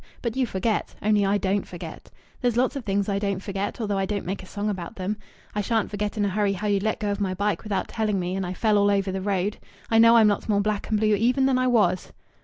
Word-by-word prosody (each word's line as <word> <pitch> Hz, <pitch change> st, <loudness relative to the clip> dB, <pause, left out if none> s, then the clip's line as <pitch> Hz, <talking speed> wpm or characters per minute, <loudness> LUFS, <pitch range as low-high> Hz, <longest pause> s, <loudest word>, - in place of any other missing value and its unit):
But 235 Hz, -2 st, -2 dB
you 260 Hz, -2 st, +1 dB
forget. 210 Hz, +3 st, -1 dB
Only 210 Hz, -1 st, +3 dB
I 200 Hz, +1 st, +3 dB
don't 200 Hz, +1 st, 0 dB
forget. 175 Hz, -, -9 dB, 0.3 s
There's 245 Hz, -2 st, +1 dB
lots 255 Hz, +3 st, +2 dB
of 275 Hz, -, -4 dB
things 200 Hz, -1 st, 0 dB
I 200 Hz, -1 st, 0 dB
don't 200 Hz, -2 st, -1 dB
forget, 200 Hz, +3 st, -4 dB
although 205 Hz, -3 st, -1 dB
I 190 Hz, -, 0 dB
don't 205 Hz, -1 st, -3 dB
make 190 Hz, +3 st, -3 dB
a 185 Hz, -, -12 dB
song 205 Hz, +1 st, -3 dB
about 190 Hz, 0 st, -4 dB
them. 190 Hz, +3 st, -2 dB, 0.4 s
I 210 Hz, -, 0 dB
shan't 225 Hz, +1 st, 0 dB
forget 210 Hz, 0 st, -3 dB
in 205 Hz, -, +2 dB
a -, -, +1 dB
hurry 200 Hz, +1 st, +1 dB
how 200 Hz, +2 st, -5 dB
you 205 Hz, -1 st, +2 dB
let 215 Hz, +2 st, -1 dB
go 205 Hz, -1 st, -1 dB
of 200 Hz, 0 st, -3 dB
my 185 Hz, -2 st, -1 dB
bike 205 Hz, +2 st, 0 dB
without 210 Hz, -3 st, -2 dB
telling 215 Hz, -3 st, -1 dB
me 180 Hz, +1 st, -2 dB
and 195 Hz, -, -2 dB
I 180 Hz, 0 st, -4 dB
fell 215 Hz, -1 st, +3 dB
all 205 Hz, 0 st, +4 dB
over 195 Hz, -1 st, +1 dB
the 190 Hz, 0 st, -3 dB
road. 200 Hz, +1 st, -1 dB, 0.3 s
I 225 Hz, -, +5 dB
know 230 Hz, +1 st, +7 dB
I'm 220 Hz, -2 st, +6 dB
lots 205 Hz, +1 st, 0 dB
more 205 Hz, -1 st, +3 dB
black 210 Hz, 0 st, -1 dB
and 215 Hz, -2 st, +1 dB
blue 215 Hz, 0 st, +3 dB
even 245 Hz, +5 st, +2 dB
than 265 Hz, -1 st, +3 dB
I 255 Hz, -, +2 dB
was." 195 Hz, -7 st, +2 dB
205 Hz, 275 wpm, -25 LUFS, 195-220 Hz, 0.4 s, know